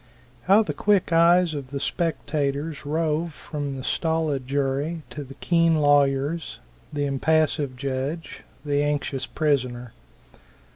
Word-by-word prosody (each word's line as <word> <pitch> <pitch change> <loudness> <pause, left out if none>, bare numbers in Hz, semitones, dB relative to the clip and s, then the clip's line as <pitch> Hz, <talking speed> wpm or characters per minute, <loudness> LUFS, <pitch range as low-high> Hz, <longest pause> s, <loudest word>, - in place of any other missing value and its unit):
How 200 +4 +6
the - - -3
quick 200 -5 +2
eyes 170 0 +5
of 140 -3 -6
the 140 0 -4
spectators 145 -2 -2
rove 160 +1 -1
from 145 -3 -5
the 130 - -6
stolid 160 -5 -1
jury 140 +4 -1
to 150 - -6
the 135 0 -12
keen 165 +2 +2
lawyers, 145 +2 +2 0.3
the 145 -1 -1
impassive 145 0 +1
judge, 135 +5 -4 0.2
the 145 0 +1
anxious 145 -2 -1
prisoner. 125 -6 -1
145 Hz, 125 wpm, -24 LUFS, 140-165 Hz, 0.3 s, How